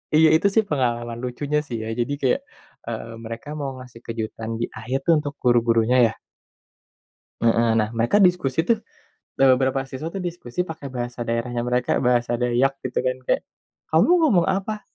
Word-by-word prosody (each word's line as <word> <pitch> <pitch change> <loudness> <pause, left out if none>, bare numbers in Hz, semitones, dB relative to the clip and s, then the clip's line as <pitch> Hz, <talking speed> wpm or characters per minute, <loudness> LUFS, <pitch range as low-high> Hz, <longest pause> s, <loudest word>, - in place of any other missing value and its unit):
Iya. 160 +1 +7
Itu, 165 +5 +3
sih, 220 - +5
pengalaman 120 -4 -1
lucunya, 145 +4 -1
sih, 120 - -4
ya. - - -5
Jadi, 120 +4 0
kayak, 130 -3 +2 0.5
eee, - - -4 0.2
mereka 115 +3 -7
mau 140 -2 -3
ngasih 125 -2 -12
kejutan 110 -1 -5
di 120 - 0
akhir, 120 +5 -2
tuh, 170 - +6
untuk 145 -1 -5
guru-gurunya, 120 0 +3
ya. - - -3 1.3
Heeh. 115 0 +3
Nah, 105 -1 +1
mereka 115 - +3
diskusi, 175 -6 +3
tuh, 230 - +3 0.6
eee, 135 - +5
beberapa 130 +1 +1
siswa, 135 +4 -6
tuh, 190 +2 -5
diskusi 175 -2 -3
pakai 160 -5 -7
bahasa 120 -1 -5
daerahnya 120 +1 -1
mereka, 125 0 0
bahasa 120 -1 +2
Dayak, 125 +3 +2
gitu, 130 - -2
kan, 130 0 +1
kayak, - - +2 0.5
"Kamu 160 - +4
ngomong 210 - +4
apa?" 195 +3 -1
130 Hz, 170 wpm, -23 LUFS, 120-155 Hz, 1.3 s, Iya